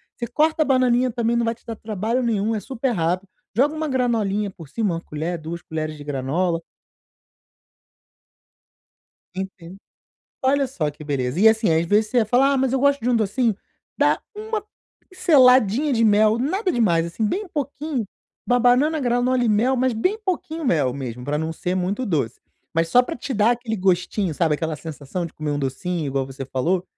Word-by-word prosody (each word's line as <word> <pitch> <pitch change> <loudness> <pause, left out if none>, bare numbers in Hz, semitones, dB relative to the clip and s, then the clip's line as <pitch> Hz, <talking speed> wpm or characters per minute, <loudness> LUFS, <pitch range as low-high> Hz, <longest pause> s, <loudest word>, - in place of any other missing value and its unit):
você 235 - -4
corta 310 +6 +1
a - - +4
bananinha 255 -1 +3
também 235 0 0
não 235 - +2
vai 230 0 0
te - - -31
dar 230 - -5
trabalho 220 +4 -2
nenhum, 225 -2 0
é 215 - -1
super 260 +2 -2
rápido, 180 0 -1 0.3
joga 285 +5 +3
uma 310 0 -2
granolinha 220 -6 0
por 165 -6 -13
cima, 210 -3 -1
uma 165 - -3
colher, 160 +3 -4
duas 165 +2 -6
colheres 155 -1 -4
de 145 - -9
granola. 160 +5 -1 2.7
Entendo. 190 -1 -7 0.7
Olha 275 +1 +3
só 160 - -2
que 150 +1 -12
beleza 135 0 -2
e 220 +2 +7
assim 220 -6 +2
às 165 +1 +2
vezes 210 +3 +2
você 250 - -2
ia 220 - +2
falar 265 +5 +3
ah - - +2
mas 260 -1 +1
eu 265 - +1
gosto 280 -1 +3
de 240 - -1
um 245 - +3
docinho, 225 0 +1 0.4
dá - - +2
uma 430 0 -4 0.4
pinceladinha 260 - +4
de 230 -1 +2
mel, 215 +1 +4
nada 365 - 0
demais 170 - +2
assim 170 +6 -3
bem 390 - -1
pouquinho, 285 -3 -3 0.4
uma 245 0 +2
banana 265 +6 +3
granola 245 0 +1
e 230 - +2
mel, 240 +5 +2
mas 255 0 +1
bem 370 - 0
pouquinho 330 -3 -3
mel 145 - +2
mesmo, 125 -3 -6
para 145 +1 -1
não 160 +1 -2
ser 180 +3 -2
muito 195 +7 -1
doce. 140 - -1 0.3
Mas 165 0 +1
só 250 +8 +5
pra - - -5
te 265 +2 -5
dar 210 +2 +4
aquele 235 -2 -3
gostinho, 185 -1 0
sabe, 160 -2 +2
aquela 160 0 -2
sensação 160 +2 -5
de - - -12
comer 155 -1 -4
um 145 - -1
docinho 155 +5 -2
igual 135 -1 -1
você 135 0 -7
falou, 170 +8 -1
215 Hz, 190 wpm, -22 LUFS, 165-255 Hz, 2.7 s, e